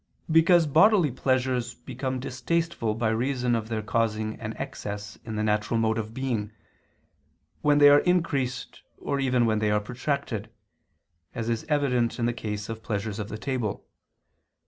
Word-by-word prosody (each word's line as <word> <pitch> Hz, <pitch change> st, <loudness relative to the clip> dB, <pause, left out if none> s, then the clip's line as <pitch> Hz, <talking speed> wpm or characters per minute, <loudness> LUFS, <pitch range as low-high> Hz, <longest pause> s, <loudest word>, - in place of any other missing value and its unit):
Because 165 Hz, +1 st, +5 dB
bodily 160 Hz, -, +5 dB
pleasures 125 Hz, -1 st, 0 dB
become 130 Hz, +1 st, -4 dB
distasteful 135 Hz, -2 st, -1 dB
by 115 Hz, 0 st, 0 dB
reason 125 Hz, +2 st, 0 dB
of 115 Hz, -1 st, -1 dB
their 110 Hz, -2 st, -2 dB
causing 110 Hz, -1 st, 0 dB
an 110 Hz, -1 st, -5 dB
excess 105 Hz, 0 st, -6 dB
in 110 Hz, -1 st, -5 dB
the 110 Hz, -, -1 dB
natural 105 Hz, +2 st, +1 dB
mode 110 Hz, 0 st, +1 dB
of 110 Hz, 0 st, -4 dB
being, 115 Hz, -4 st, -2 dB, 1.1 s
when 145 Hz, -1 st, +4 dB
they 145 Hz, 0 st, +8 dB
are 145 Hz, 0 st, +8 dB
increased 140 Hz, -8 st, -1 dB, 0.2 s
or 140 Hz, -, -2 dB
even 125 Hz, -3 st, +2 dB
when 110 Hz, -1 st, +2 dB
they 105 Hz, -1 st, +1 dB
are 105 Hz, 0 st, +3 dB
protracted; 125 Hz, -1 st, -3 dB, 0.9 s
as 115 Hz, 0 st, -3 dB
is 115 Hz, -1 st, -1 dB
evident 125 Hz, -6 st, +1 dB
in 120 Hz, -, 0 dB
the 120 Hz, -, +1 dB
case 105 Hz, -3 st, -4 dB
of 115 Hz, -1 st, -6 dB
pleasures 105 Hz, -1 st, -3 dB
of 105 Hz, 0 st, -4 dB
the 110 Hz, -, -5 dB
table. 120 Hz, -3 st, -3 dB
120 Hz, 160 wpm, -26 LUFS, 110-135 Hz, 1.1 s, they